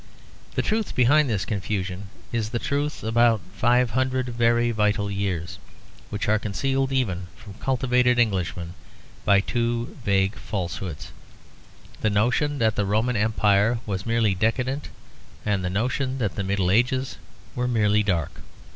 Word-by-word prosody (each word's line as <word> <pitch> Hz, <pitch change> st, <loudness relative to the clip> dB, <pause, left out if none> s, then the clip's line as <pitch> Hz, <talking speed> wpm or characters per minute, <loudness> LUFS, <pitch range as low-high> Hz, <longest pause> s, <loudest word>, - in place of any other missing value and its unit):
The -, -, +1 dB
truth 220 Hz, 0 st, -1 dB
behind 140 Hz, +3 st, +4 dB
this 105 Hz, -4 st, -1 dB
confusion 95 Hz, -2 st, -3 dB, 0.2 s
is 115 Hz, -2 st, -1 dB
the 120 Hz, -, -2 dB
truth 145 Hz, +4 st, -2 dB
about 115 Hz, 0 st, +3 dB, 0.2 s
five 120 Hz, +3 st, +3 dB
hundred 130 Hz, +1 st, 0 dB
very 120 Hz, 0 st, +2 dB
vital 105 Hz, -2 st, +1 dB
years, 95 Hz, -4 st, -3 dB, 0.5 s
which 105 Hz, 0 st, -3 dB
are 110 Hz, +1 st, +3 dB
concealed 135 Hz, +6 st, -1 dB
even 95 Hz, -9 st, -1 dB
from 100 Hz, -, -12 dB
cultivated 125 Hz, -1 st, +2 dB
Englishmen 90 Hz, -6 st, 0 dB, 0.5 s
by 100 Hz, -1 st, +5 dB
two 120 Hz, +1 st, -2 dB
vague 95 Hz, -1 st, +2 dB
falsehoods; 90 Hz, -6 st, -5 dB, 0.9 s
the 110 Hz, -, +2 dB
notion 125 Hz, +8 st, +1 dB
that 110 Hz, -4 st, +2 dB
the 105 Hz, -, 0 dB
Roman 110 Hz, +5 st, +1 dB
Empire 105 Hz, +1 st, +2 dB
was 100 Hz, 0 st, -4 dB
merely 115 Hz, -3 st, +2 dB
decadent 125 Hz, +8 st, -1 dB, 0.6 s
and 100 Hz, -3 st, 0 dB
the 90 Hz, -, -1 dB
notion 130 Hz, +6 st, -1 dB
that 105 Hz, -7 st, -1 dB
the 100 Hz, -, -2 dB
Middle 95 Hz, -2 st, +1 dB
Ages 130 Hz, +4 st, +1 dB, 0.4 s
were 125 Hz, 0 st, -1 dB
merely 105 Hz, -3 st, +3 dB
dark. 90 Hz, -7 st, -2 dB
110 Hz, 140 wpm, -24 LUFS, 100-125 Hz, 0.9 s, by